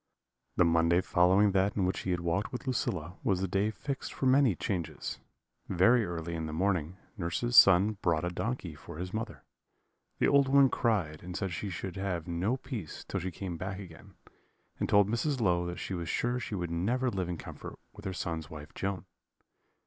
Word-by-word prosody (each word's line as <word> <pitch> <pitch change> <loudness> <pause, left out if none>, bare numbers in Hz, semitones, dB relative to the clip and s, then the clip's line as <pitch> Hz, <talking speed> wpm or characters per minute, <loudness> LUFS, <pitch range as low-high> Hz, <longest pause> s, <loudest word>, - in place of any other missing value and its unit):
"The 90 - +4
Monday 85 +1 +4
following 95 +3 +4
that 95 +1 +2
in 95 - +2
which 90 - -1
he - - -4
had 90 -1 0
walked 85 +5 -1
with 125 - -6
Lucilla 90 - -2
was 95 -2 +2
the 95 - -1
day 100 +3 +1
fixed 135 +5 -5
for - - -2
the 130 - +6
many 130 -7 +4
changes. 85 -5 -3 0.5
Very 115 +7 +4
early 85 -1 -4
in 80 -1 -3
the - - -4
morning, 90 -1 0 0.2
nurse's 105 +7 -1
son 100 +1 +7
brought 85 -1 +1
a 90 - -1
donkey 105 -3 -3
for 75 +1 -10
his 90 +2 -5
mother. 110 0 -4 0.7
The - - +3
old 140 -1 +5
woman 135 0 +6
cried, 90 -10 0
and 90 +1 -6
said 95 -4 -2
she 100 +4 -3
should 95 +1 -5
have 90 -4 -2
no 90 +9 0
peace 115 - -6
till - - -2
she 95 - -3
came 90 0 -5
back 95 +3 -4
again, 90 -5 -12 0.6
and - - -1
told 100 -1 +5
Mrs. 130 +6 0
Low 90 -5 +2
that 85 0 -5
she 95 - -5
was 85 -1 -3
sure 120 +1 0
she 115 -3 -4
should 85 -3 -3
never 120 +10 0
live 95 -4 -2
in 85 - -3
comfort - - -9 0.2
with 105 +1 -13
her 95 - -1
son's 80 -3 -4
wife 75 -1 -10
Joan. 95 -2 -3
95 Hz, 200 wpm, -31 LUFS, 85-110 Hz, 0.7 s, son